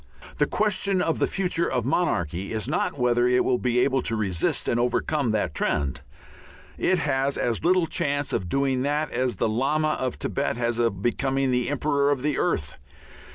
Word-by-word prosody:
The - - +3
question 200 -2 +1
of 165 -2 0
the - - +2
future 180 -3 0
of 125 -3 -1
monarchy 100 - -1
is 110 -3 -2
not - - -1
whether 120 -1 +2
it 125 0 +3
will 125 -1 +1
be 125 -1 0
able 135 0 +2
to 115 - -2
resist 95 -6 -1
and 120 - +1
overcome 125 +2 0
that 105 -7 0
trend; 70 -3 -1 0.7
it 185 - +1
has 140 -3 0
as 120 -2 -1
little 180 0 +3
chance 145 -2 -1
of 90 - -2
doing 135 +1 +1
that 145 +3 -1
as 125 0 -1
the - - 0
Lama 140 +8 +1
of 130 -4 -2
Thibet 140 -4 -2
has 120 -1 -1
of 100 -5 0
becoming 135 +2 0
Emperor 140 +3 +1
of 140 -3 0
the 150 -2 0
Earth. 75 +1 -1
130 Hz, 180 wpm, -25 LUFS, 120-145 Hz, 0.7 s, The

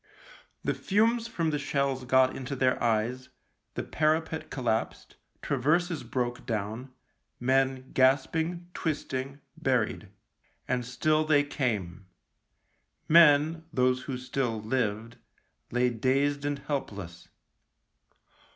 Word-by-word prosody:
The - - +1
fumes 225 +3 +1
from 165 -8 -1
the 150 - -1
shells 140 -2 -1
got 130 +1 +4
into 135 +1 -5
their 130 -1 +1
eyes, 120 +3 0 0.5
the - - -2
parapet 160 +1 0
collapsed, 115 -5 -2 0.3
traverses 155 +5 +1
broke 120 -1 -3
down, 110 +3 -3 0.5
men 130 +1 +1
gasping, 160 +6 +2
twist 155 -4 -3
ing, 135 +2 -4
buried. 125 -9 -1 0.6
And 125 -1 0
still 155 +4 +1
they 150 -2 +4
came. 105 - -3 1.0
Men, 160 0 +5
those 130 -2 +2
who 130 0 -4
still 125 -3 -2
lived, 110 -1 -2 0.5
lay 125 +1 +1
dazed 140 +5 +1
and 145 0 -1
help 140 -2 -3
less. 85 -4 -9
130 Hz, 110 wpm, -28 LUFS, 125-150 Hz, 1.0 s, Men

